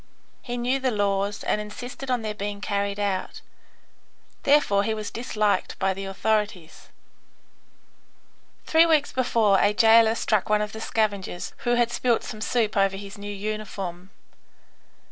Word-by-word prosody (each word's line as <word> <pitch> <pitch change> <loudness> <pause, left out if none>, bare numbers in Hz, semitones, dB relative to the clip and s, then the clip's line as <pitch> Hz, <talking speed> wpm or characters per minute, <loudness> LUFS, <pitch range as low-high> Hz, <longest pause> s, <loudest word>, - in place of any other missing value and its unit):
He 245 -1 -5
knew 250 +3 0
the 265 -1 0
laws 200 -2 -1
and 210 - 0
insisted 245 +6 -8
on 245 -3 0
their 215 -1 -3
being 205 -1 -5
carried 200 0 -2
out. 195 -2 -2 1.0
Therefore 280 -9 +3
he 220 +1 -1
was 215 -1 -5
disliked 215 -3 -1
by 190 0 +1
the 195 +1 -6
authorities. 195 -3 -2 1.8
Three 325 +1 +5
weeks 310 -3 +2
before 225 -6 +2
a 205 +1 +2
jailer 225 0 +6
struck 215 -1 0
one 210 0 +3
of 210 - -5
the 220 - -8
scavengers 205 -6 -2
who 240 0 +3
had 240 -1 +2
spilt 240 -1 +1
some 215 - -7
soup 220 -1 0
over 195 -1 +2
his 200 0 -9
new 205 0 -6
uniform. 195 -3 -5
210 Hz, 145 wpm, -25 LUFS, 200-230 Hz, 1.8 s, jailer